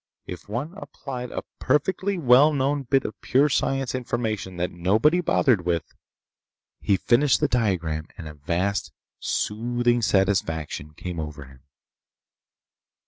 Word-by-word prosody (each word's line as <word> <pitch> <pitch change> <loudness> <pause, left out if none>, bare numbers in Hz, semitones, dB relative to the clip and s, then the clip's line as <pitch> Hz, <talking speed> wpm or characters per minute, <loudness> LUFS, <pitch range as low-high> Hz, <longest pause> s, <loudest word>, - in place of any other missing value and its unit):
If 90 +3 -9
one 130 - -3
applied 125 -10 -7
a - - -5 0.2
perfectly 185 +8 0
well 140 0 +6
known 140 +1 0
bit 135 0 +1
of 110 - -6
pure 140 +4 +3
science 135 -1 0
information 110 -7 -3
that 90 +1 -1
nobody 110 - +2
bothered 125 - +2
with— 85 -1 -2 0.9
He 100 - +2
finished 120 +1 +3
the - - +2
diagram 85 -10 -1
and 80 - -8
a 75 - -8
vast, 85 +7 -2 0.3
soothing 120 +2 0
satisfaction 80 -7 0
came 90 0 -6
over 75 -2 -6
him. 65 -1 -17
110 Hz, 130 wpm, -24 LUFS, 90-135 Hz, 0.9 s, well